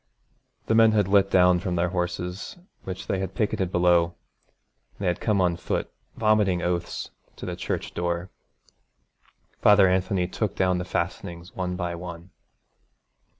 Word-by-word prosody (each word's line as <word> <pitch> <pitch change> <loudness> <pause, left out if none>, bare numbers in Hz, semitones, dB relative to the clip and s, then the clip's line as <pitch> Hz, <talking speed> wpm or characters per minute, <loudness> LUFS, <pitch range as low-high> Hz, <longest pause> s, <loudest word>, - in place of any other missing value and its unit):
The - - +1
men 110 -1 +6
had 105 -3 +2
lit 100 0 +4
down 90 -1 +5
from 90 0 -2
their 85 0 +1
horses, 90 - -3 0.3
which 95 -1 -6
they 95 - -1
had 95 -1 -4
picketed 95 -3 0
below, 85 -1 +3 0.8
and 100 - -4
had 90 - 0
come 105 -3 +1
on 90 -2 +2
foot, - - -3 0.2
vomiting 105 -5 +2
oaths, 85 -1 -3 0.2
to - - -8
the - - -4
church - - -4
door. 85 +1 -2 1.3
Father 105 -2 +7
Anthony 95 0 +1
took 105 +2 -2
down 90 -1 +1
the 90 - -4
fastenings 85 0 -4
one 90 -1 -2
by 90 -1 -3
one. 85 +1 -8
90 Hz, 150 wpm, -25 LUFS, 90-95 Hz, 1.3 s, Father